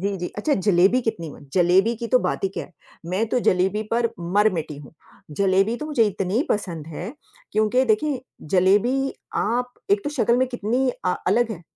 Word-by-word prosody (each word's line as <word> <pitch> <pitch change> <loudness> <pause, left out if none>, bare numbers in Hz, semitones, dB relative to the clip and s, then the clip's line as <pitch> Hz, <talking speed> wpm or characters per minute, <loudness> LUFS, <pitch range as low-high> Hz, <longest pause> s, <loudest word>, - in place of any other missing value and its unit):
जी, 200 +1 -1
जी, 180 -1 -4
अच्छा 285 +8 +1
जलेबी 195 +4 +3
कितनी 170 -8 -3
म - - -13
जलेबी 185 +5 +3
की 235 - -5
तो 255 - +4
बात - - -2
ही 195 - +2
क्या 195 - -6
है? 180 - -19 0.3
मैं 190 +6 0
तो 250 - +1
जलेबी 190 +2 +1
पर 230 0 +2
मर-मिटी 175 -3 0
हूँ, 140 -1 -12 0.4
जलेबी 195 +3 +2
तो 300 - -6
मुझे 290 -7 +2
इतनी 195 +4 -1
पसंद 170 -7 -2
है, 175 - -6 0.4
क्योंकि 215 +5 +2
देखिए 255 +4 +1 0.3
जलेबी 210 +9 +3 0.2
आप 245 +3 -1 0.2
एक 200 0 +3
तो 290 - -2
शक्ल 240 -4 +2
में 260 +1 +2
कितनी 245 +2 -1 0.2
अ, 180 - +2
अलग 240 -1 +2
है, 175 -4 -9
210 Hz, 190 wpm, -23 LUFS, 185-240 Hz, 0.4 s, तो